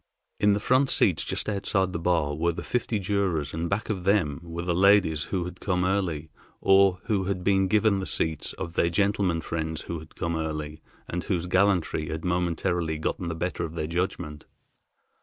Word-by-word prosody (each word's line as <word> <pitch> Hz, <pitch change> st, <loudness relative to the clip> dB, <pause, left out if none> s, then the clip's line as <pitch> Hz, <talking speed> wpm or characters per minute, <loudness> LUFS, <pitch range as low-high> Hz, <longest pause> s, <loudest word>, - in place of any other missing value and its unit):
In 105 Hz, 0 st, +4 dB
the 100 Hz, -, +1 dB
front 130 Hz, +5 st, +3 dB
seats -, -, +2 dB
just -, -, -3 dB
outside 95 Hz, -2 st, 0 dB
the 85 Hz, -, -2 dB
bar 85 Hz, -4 st, +1 dB
were 85 Hz, +3 st, +1 dB
the -, -, -6 dB
fifty 120 Hz, -2 st, -1 dB
jurors 95 Hz, -7 st, -1 dB
and 85 Hz, +1 st, -2 dB
back 100 Hz, +2 st, -1 dB
of 95 Hz, -5 st, -3 dB
them 90 Hz, -7 st, +2 dB
were 85 Hz, 0 st, -6 dB
the 90 Hz, 0 st, 0 dB
ladies 90 Hz, -4 st, +4 dB
who 90 Hz, 0 st, -2 dB
had 90 Hz, 0 st, -8 dB
come 90 Hz, -2 st, 0 dB
early, 85 Hz, -6 st, -1 dB, 0.3 s
or 95 Hz, -1 st, +5 dB
who 100 Hz, -4 st, 0 dB
had 95 Hz, -2 st, -2 dB
been 95 Hz, 0 st, +3 dB
given 105 Hz, 0 st, +3 dB
the 95 Hz, -, -3 dB
seats 80 Hz, -2 st, -1 dB
of 85 Hz, -, -6 dB
their 85 Hz, -, +2 dB
gentlemen 100 Hz, -2 st, +1 dB
friends 80 Hz, -1 st, -3 dB
who 85 Hz, -1 st, -5 dB
had 80 Hz, -, -14 dB
come 85 Hz, 0 st, -2 dB
early, 75 Hz, -1 st, -4 dB, 0.3 s
and 90 Hz, +1 st, -4 dB
whose 90 Hz, -4 st, -1 dB
gallantry 90 Hz, -4 st, +1 dB
had 80 Hz, +2 st, -4 dB
momentarily 85 Hz, -2 st, 0 dB
gotten 85 Hz, +3 st, -2 dB
the 85 Hz, -, -3 dB
better 90 Hz, +3 st, -2 dB
of 80 Hz, -, -5 dB
their 80 Hz, -, -2 dB
judgment. 85 Hz, -2 st, -3 dB
90 Hz, 195 wpm, -26 LUFS, 80-100 Hz, 0.3 s, or